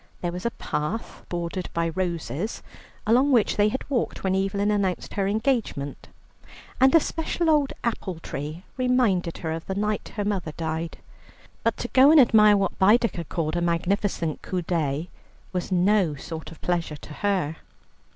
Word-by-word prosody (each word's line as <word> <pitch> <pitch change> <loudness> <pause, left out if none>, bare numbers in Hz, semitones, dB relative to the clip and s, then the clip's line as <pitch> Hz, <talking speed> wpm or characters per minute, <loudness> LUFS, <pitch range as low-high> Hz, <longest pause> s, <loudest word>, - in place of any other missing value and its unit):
There 175 - -1
was 180 +6 -3
a 235 - -5
path 150 +9 -4
bordered 175 +1 -3
by 170 0 +1
roses, 175 +2 -3 0.4
along 250 +6 +4
which 235 -5 +3
they 205 0 +4
had 260 - -4
walked 260 -5 -2
when 190 -1 +1
Evelyn 200 +2 +1
announced 195 -3 -1
her 195 -1 0
engagement, 215 - -1 0.7
and 265 +4 +6
a - - +9
special 325 +1 -1
old 295 -3 +3
apple 205 -6 -2
tree 155 +2 -6
reminded 245 -9 +2
her 160 - -4
of 165 0 -5
the 190 - -2
night 210 +1 -2
her 205 -2 -2
mother 190 -7 -2
died. 160 0 -3 0.7
But - - +1
to - - -3
go 265 +2 +6
and 315 0 +8
admire 215 -4 +6
what 195 -2 -1
Baedeker 205 -3 +3
called 155 +1 -2
a 175 - 0
magnificent 170 -1 0
coup 180 -2 -3
d'oeil 155 -3 -1 0.5
was 180 +1 -3
no 185 -3 +3
sort 160 +2 -7
of 160 - -13
pleasure 170 -4 -1
to 150 - -11
her. 185 -6 0
190 Hz, 165 wpm, -25 LUFS, 165-215 Hz, 0.7 s, a